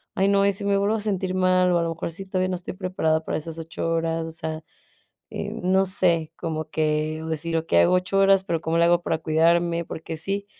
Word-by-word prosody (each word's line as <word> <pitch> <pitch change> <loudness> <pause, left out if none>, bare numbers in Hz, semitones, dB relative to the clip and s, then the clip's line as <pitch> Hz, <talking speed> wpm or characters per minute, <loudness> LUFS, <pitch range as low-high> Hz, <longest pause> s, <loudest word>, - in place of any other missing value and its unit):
"Ay, 195 - +2
no, 200 0 +3
¿y 200 - +4
si 200 +1 -5
me 200 0 +2
vuelvo 200 +2 +1
a - - -2
sentir 190 -3 -2
mal?, 185 -1 +3
o 175 - +3
a - - 0
lo 165 - -1
mejor 165 0 -4
sí 195 +4 -7
todavía 185 -1 -1
no 185 - -1
estoy 175 - -7
preparada 170 -4 0
para - - -2
esas 160 +1 -7
8 165 +1 -4
horas". 165 0 -1
O 165 - -6
sea, 160 -1 -5 0.7
eh, - - -4
no 190 +1 +3
sé, 170 -4 +1
como 155 -1 -4
que 155 0 -1
decir: 165 +1 -2
"Okey, 160 - +1
hago 85 - +4
8 185 +2 +1
horas". 195 -1 +4
Pero, 170 -4 -1
¿cómo 165 0 -1
le 170 - +5
hago 175 0 +4
para 165 - 0
cuidarme? 170 +2 +2
Porque 160 0 -6
sí, 200 +4 -3
170 Hz, 240 wpm, -24 LUFS, 160-190 Hz, 0.7 s, le